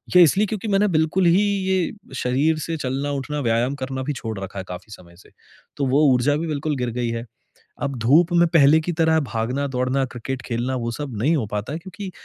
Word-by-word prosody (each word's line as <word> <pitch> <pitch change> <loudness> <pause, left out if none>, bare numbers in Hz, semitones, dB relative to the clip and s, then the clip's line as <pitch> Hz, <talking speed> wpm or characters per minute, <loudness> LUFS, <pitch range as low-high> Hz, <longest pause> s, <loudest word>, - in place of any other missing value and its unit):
ये 180 - +10
इसलिए 200 +6 +3
क्योंकि 215 +1 -4
मैंने 205 +1 +3
बिल्कुल 160 +3 +2
ही 175 +3 +5
ये 190 -3 0 0.2
शरीर 140 +6 +1
से 165 -1 -3
चलना-उठना, 140 +2 -3
व्यायाम 120 +2 +1
करना 130 -1 -4
भी 150 - -2
छोड़ 110 -5 -5
रखा 95 0 -6
है 95 - -6
काफ़ी 90 +4 -8
समय 85 -2 -14
से। - - -19 0.5
तो 140 - 0
वो 140 +4 +3
ऊर्जा 125 +4 +2
भी 165 - -3
बिल्कुल 150 0 -2
गिर 125 -1 -1
गई 120 -1 0
है। 115 0 -4 0.6
अब 140 -2 -2
धूप 155 +10 +4
में 175 0 +5
पहले 160 -1 +5
की 175 +2 -3
तरह 160 0 +3
भागना-दौड़ना, 130 +2 -1
क्रिकेट 130 +1 -6
खेलना 125 +2 -2
वो 120 -1 -2
सब 135 -3 -5
नहीं 155 +5 +3
हो 115 -7 -1
पाता 105 +6 -3
है - - -3
क्योंकि, 190 +2 -8
140 Hz, 210 wpm, -22 LUFS, 125-160 Hz, 0.6 s, ये